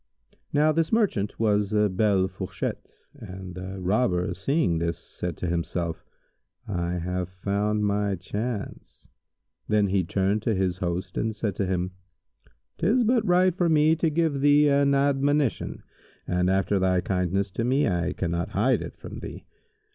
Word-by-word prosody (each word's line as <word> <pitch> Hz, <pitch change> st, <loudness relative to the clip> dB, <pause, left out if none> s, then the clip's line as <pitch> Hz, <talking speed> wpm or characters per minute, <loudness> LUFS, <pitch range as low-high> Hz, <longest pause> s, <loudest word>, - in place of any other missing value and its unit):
Now 150 Hz, +2 st, +4 dB
this 160 Hz, +1 st, 0 dB
merchant 195 Hz, -, +1 dB
was 105 Hz, -2 st, +1 dB
a 105 Hz, 0 st, +4 dB
belle 95 Hz, -1 st, +2 dB
fourchette, 95 Hz, -2 st, -5 dB, 0.3 s
and 95 Hz, 0 st, -9 dB
the 95 Hz, +1 st, -6 dB
Robber 90 Hz, -2 st, +1 dB
seeing 100 Hz, -, 0 dB
this, 85 Hz, 0 st, -1 dB
said 90 Hz, -3 st, -6 dB
to 90 Hz, -, -3 dB
himself, 85 Hz, -1 st, -2 dB, 0.6 s
"I 85 Hz, -3 st, -2 dB
have 90 Hz, +1 st, -2 dB
found 100 Hz, +3 st, -1 dB
my 100 Hz, -1 st, 0 dB
chance." 105 Hz, +5 st, -6 dB, 0.6 s
Then 105 Hz, -2 st, +2 dB
he 95 Hz, -1 st, +2 dB
turned 95 Hz, +4 st, 0 dB
to 110 Hz, 0 st, 0 dB
his 95 Hz, -1 st, -1 dB
host 90 Hz, -1 st, -3 dB
and 110 Hz, -1 st, -1 dB
said 105 Hz, -2 st, -2 dB
to 100 Hz, -, 0 dB
him, 90 Hz, 0 st, -1 dB, 0.9 s
"'Tis 220 Hz, +9 st, +3 dB
but 235 Hz, 0 st, +3 dB
right 180 Hz, 0 st, +4 dB
for 175 Hz, -1 st, +1 dB
me 155 Hz, 0 st, +4 dB
to 165 Hz, 0 st, +1 dB
give 155 Hz, -3 st, 0 dB
thee 145 Hz, +1 st, +5 dB
an 140 Hz, 0 st, +3 dB
admonition, 140 Hz, 0 st, +1 dB, 0.4 s
and 90 Hz, 0 st, +1 dB
after 95 Hz, +1 st, +2 dB
thy 95 Hz, -1 st, +2 dB
kindness 95 Hz, +2 st, -1 dB
to 115 Hz, -, -2 dB
me, 130 Hz, +4 st, +2 dB
I 90 Hz, -1 st, 0 dB
cannot 85 Hz, -1 st, -2 dB
hide -, -, +3 dB
it -, -, -8 dB
from -, -, -9 dB
thee. -, -, -8 dB
100 Hz, 155 wpm, -26 LUFS, 90-140 Hz, 0.9 s, thee